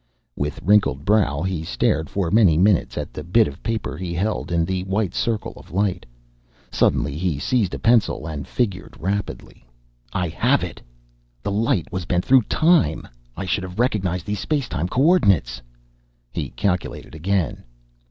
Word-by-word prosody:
With 70 Hz, 0 st, -3 dB
wrinkled 95 Hz, -8 st, +3 dB
brow, 90 Hz, -8 st, +2 dB
he 95 Hz, -4 st, -2 dB
stared 80 Hz, -1 st, 0 dB
for 95 Hz, -4 st, -1 dB
many 100 Hz, -7 st, +5 dB
minutes 95 Hz, +1 st, +2 dB
at -, -, -4 dB
the 75 Hz, -, -6 dB
bit 105 Hz, +7 st, +3 dB
of 70 Hz, -, -9 dB
paper 115 Hz, -9 st, -3 dB
he 85 Hz, -1 st, -4 dB
held 100 Hz, +1 st, -2 dB
in 85 Hz, -1 st, +2 dB
the 95 Hz, +1 st, -2 dB
white 95 Hz, -1 st, -1 dB
circle 115 Hz, -2 st, -1 dB
of -, -, -14 dB
light. 95 Hz, +1 st, -1 dB, 0.6 s
Suddenly 70 Hz, -1 st, +1 dB
he 85 Hz, -2 st, -1 dB
seized 105 Hz, -, 0 dB
a -, -, -3 dB
pencil 115 Hz, -8 st, +2 dB
and 75 Hz, -3 st, -5 dB
figured 100 Hz, -7 st, -2 dB
rapidly. 100 Hz, -3 st, -4 dB, 0.5 s
"I 90 Hz, -, -1 dB
have -, -, +2 dB
it! -, -, -6 dB, 0.6 s
The -, -, -2 dB
light 100 Hz, -4 st, 0 dB
was 95 Hz, -2 st, -3 dB
bent 90 Hz, -1 st, 0 dB
through 130 Hz, -4 st, +5 dB
time! 160 Hz, -, +3 dB, 0.3 s
I 95 Hz, -, -3 dB
should 95 Hz, +1 st, 0 dB
have 90 Hz, 0 st, -8 dB
recognized 95 Hz, -8 st, 0 dB
these 105 Hz, -1 st, -3 dB
space 145 Hz, -1 st, -1 dB
time 85 Hz, -3 st, -2 dB
coordinates." 100 Hz, -, +3 dB, 0.7 s
He -, -, -3 dB
calculated 90 Hz, -6 st, -2 dB
again. 85 Hz, 0 st, -1 dB
95 Hz, 160 wpm, -22 LUFS, 80-105 Hz, 0.7 s, many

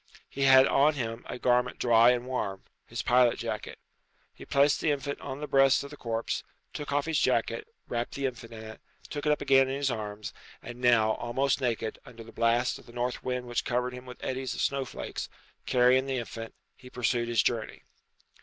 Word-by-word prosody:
He 140 Hz, -, -7 dB
had 130 Hz, 0 st, +8 dB
on 145 Hz, +3 st, +3 dB
him 115 Hz, -3 st, -4 dB
a -, -, -4 dB
garment 125 Hz, 0 st, +1 dB
dry 115 Hz, 0 st, +5 dB
and 125 Hz, 0 st, +1 dB
warm 100 Hz, -7 st, -3 dB, 0.2 s
his -, -, -4 dB
pilot 125 Hz, -1 st, +4 dB
jacket. -, -, -5 dB, 0.6 s
He -, -, -12 dB
placed 140 Hz, +1 st, +3 dB
the 160 Hz, -, +1 dB
infant 140 Hz, -1 st, -2 dB
on 135 Hz, +2 st, -6 dB
the 150 Hz, -, -4 dB
breast 135 Hz, 0 st, +4 dB
of 140 Hz, -, -9 dB
the -, -, -8 dB
corpse, 115 Hz, -4 st, -3 dB, 0.3 s
took 145 Hz, -1 st, -5 dB
off 145 Hz, 0 st, +1 dB
his 160 Hz, -2 st, +1 dB
jacket, 440 Hz, -, 0 dB, 0.2 s
wrapped 120 Hz, 0 st, -3 dB
the 140 Hz, -, -2 dB
infant 120 Hz, -3 st, -5 dB
in 110 Hz, -1 st, -9 dB
it, 110 Hz, 0 st, -10 dB, 0.3 s
took 145 Hz, 0 st, -3 dB
it -, -, +4 dB
up 150 Hz, -, 0 dB
again 135 Hz, -1 st, +4 dB
in 135 Hz, -, -2 dB
his 140 Hz, -1 st, 0 dB
arms, 105 Hz, -2 st, -5 dB, 0.3 s
and 120 Hz, +1 st, -10 dB
now, 115 Hz, -3 st, +4 dB
almost 135 Hz, +5 st, 0 dB
naked, 115 Hz, -3 st, -2 dB
under 115 Hz, -1 st, -12 dB
the 115 Hz, -, -13 dB
blast 120 Hz, +2 st, +1 dB
of -, -, -18 dB
the -, -, -12 dB
north 125 Hz, +1 st, -3 dB
wind 125 Hz, -1 st, -2 dB
which 120 Hz, -1 st, -2 dB
covered 125 Hz, +1 st, -1 dB
him 125 Hz, 0 st, -10 dB
with 125 Hz, -, -9 dB
eddies 130 Hz, 0 st, -3 dB
of -, -, -3 dB
snow 135 Hz, -1 st, 0 dB
flakes, -, -, -6 dB, 0.4 s
carrying 125 Hz, +2 st, +4 dB
the 135 Hz, -1 st, -1 dB
infant, 115 Hz, -1 st, -6 dB, 0.2 s
he 125 Hz, -, -14 dB
pursued 120 Hz, -1 st, 0 dB
his 115 Hz, -3 st, +2 dB
journey. 115 Hz, -2 st, -2 dB
125 Hz, 210 wpm, -29 LUFS, 120-135 Hz, 0.6 s, had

